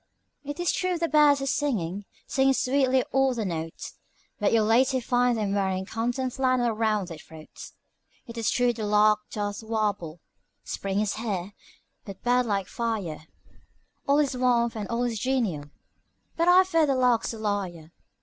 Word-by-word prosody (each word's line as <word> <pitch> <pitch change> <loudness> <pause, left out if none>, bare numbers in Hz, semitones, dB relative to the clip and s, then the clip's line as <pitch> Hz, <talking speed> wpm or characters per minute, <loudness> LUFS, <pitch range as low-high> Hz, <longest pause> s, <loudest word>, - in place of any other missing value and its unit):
It 290 +3 -6
is 350 - +1
true 365 -1 -1
the 335 0 0
birds 295 -3 +4
are - - -2
singing, 205 - -1 0.2
singing 270 0 +2
sweetly 260 -1 +2
all 270 -1 +2
their 225 -3 -2
notes, 165 -3 -6 0.4
But 210 - +2
you'll 225 -2 +3
later 255 +4 +3
find 245 0 +1
them 205 -2 -1
wearing 190 -1 -1
canton 245 +5 -2
flannel 255 -2 +1
'round 215 -4 0
their 165 -2 -8
throats. 160 0 -12 0.5
It 235 -2 -10
is 230 -2 0
true 245 -1 +2
the 220 -2 -6
lark 210 0 +4
doth 205 0 -4
warble, 205 -7 -2 0.4
'Spring 195 +1 -2
is 215 -1 -2
here,' 205 -4 -4 0.5
with 195 -1 -10
bird 245 0 +2
like 200 -3 0
fire, 200 -10 -4 0.8
'All 280 +1 +4
is 285 -3 +1
warmth 240 -2 +1
and 210 -2 -4
all 235 +1 -1
is 235 -3 -2
genial,' 205 - -1 0.7
but 335 +1 +1
I 360 +1 +7
fear 330 -4 +2
the 275 - +1
lark's 250 -3 +2
a 225 - -7
liar. 190 -7 -3
230 Hz, 170 wpm, -26 LUFS, 200-260 Hz, 0.8 s, I